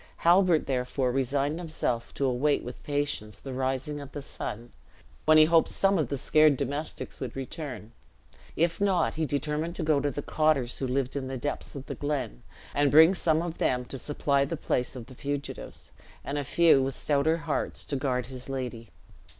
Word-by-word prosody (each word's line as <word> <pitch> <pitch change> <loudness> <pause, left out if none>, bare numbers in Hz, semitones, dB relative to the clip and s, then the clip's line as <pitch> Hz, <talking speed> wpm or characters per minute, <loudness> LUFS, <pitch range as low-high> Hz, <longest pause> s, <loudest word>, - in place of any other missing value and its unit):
Halbert, 175 -2 +5
therefore, 125 0 0
resigned 140 +4 0
himself 140 -8 -2
to 140 - 0
await 135 +3 +1
with 125 - -8
patience 145 -8 -2
the 135 - -7
rising 135 +3 -2
of 140 -1 -10
the 145 - -5
sun, 120 -3 -6 0.5
when 155 0 +6
he 155 - +8
hoped 165 0 +4
some 195 -2 +2
of 150 - +1
the 140 - -2
scared 155 +1 +4
domestics 145 +3 -4
would 130 -4 -5
return; 135 -4 -6 0.6
if 170 +3 +1
not, 190 -5 +2
he 160 0 -1
determined 150 +4 -2
to - - -3
go 155 -2 +3
to 145 - 0
the 145 +1 -5
cotters 155 -6 +1
who 135 - -1
lived 130 +1 -1
in 135 -2 -3
the 130 0 -4
depths 145 +3 -4
of 135 -1 -7
the - - -5
glen, 135 - -3 0.3
and 145 0 +3
bring 160 +5 +8
some 160 -3 +1
of 170 -1 -5
them 125 -1 +1
to 135 - -7
supply 140 0 +1
the 165 +4 -3
place 125 -2 -1
of 120 -3 -7
the 130 - -13
fugitives; 140 +2 -5 0.3
and 145 +1 -2
a - - -2
few, 160 0 +5
with 135 0 -1
stouter 150 +2 +1
hearts, 165 -3 -3
to 145 - -3
guard 130 -3 -1
his 130 0 -9
lady. 125 -4 -5
140 Hz, 190 wpm, -28 LUFS, 130-155 Hz, 0.6 s, he